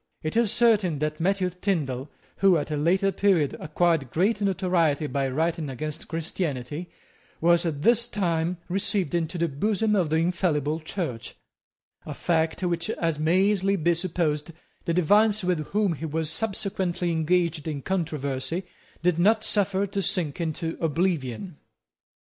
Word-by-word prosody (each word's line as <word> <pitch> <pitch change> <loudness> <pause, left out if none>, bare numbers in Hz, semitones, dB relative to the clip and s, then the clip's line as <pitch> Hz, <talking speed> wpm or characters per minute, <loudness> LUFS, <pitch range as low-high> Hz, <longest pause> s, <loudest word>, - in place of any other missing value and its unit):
It 155 - -3
is 230 -3 +3
certain 215 -9 +3
that 150 +1 -2
Matthew 185 +1 +1
Tindal, 155 -8 -2 0.3
who, 190 -3 +5
at 150 0 -3
a - - 0
later 185 +6 +2
period, 180 -7 +2
acquired 155 -3 +1
great 200 - +1
notoriety 180 -6 +1
by 140 -2 -1
writing 160 +2 -1
against 150 +4 -5
Christianity, 160 -2 -4 0.5
was 170 +1 +3
at 145 -3 -3
this 235 0 +4
time 175 -5 -1
received 190 -2 0
into 170 0 -1
the 170 0 +1
bosom 210 +8 0
of 180 -6 +1
the 155 - +1
infallible 160 -3 +1
Church, 160 - -5 0.7
a 150 - -7
fact 165 +2 0
which, 175 +2 -1
as 165 -7 -1
may 165 +5 +3
easily 195 -1 +2
be 170 -1 +2
supposed, 165 -3 -1 0.3
the 170 - 0
divines 205 +4 +4
with 175 -4 0
whom 205 -3 +1
he 160 +1 -5
was 155 0 -2
subsequently 190 -4 -2
engaged 165 -1 +1
in 145 -3 -4
controversy 160 -2 -2 0.4
did 175 -1 +2
not 215 +4 +4
suffer 200 -2 +1
to 200 0 -3
sink 170 -4 -1
into 165 0 -3
oblivion. 165 - -1
170 Hz, 145 wpm, -26 LUFS, 155-190 Hz, 0.7 s, who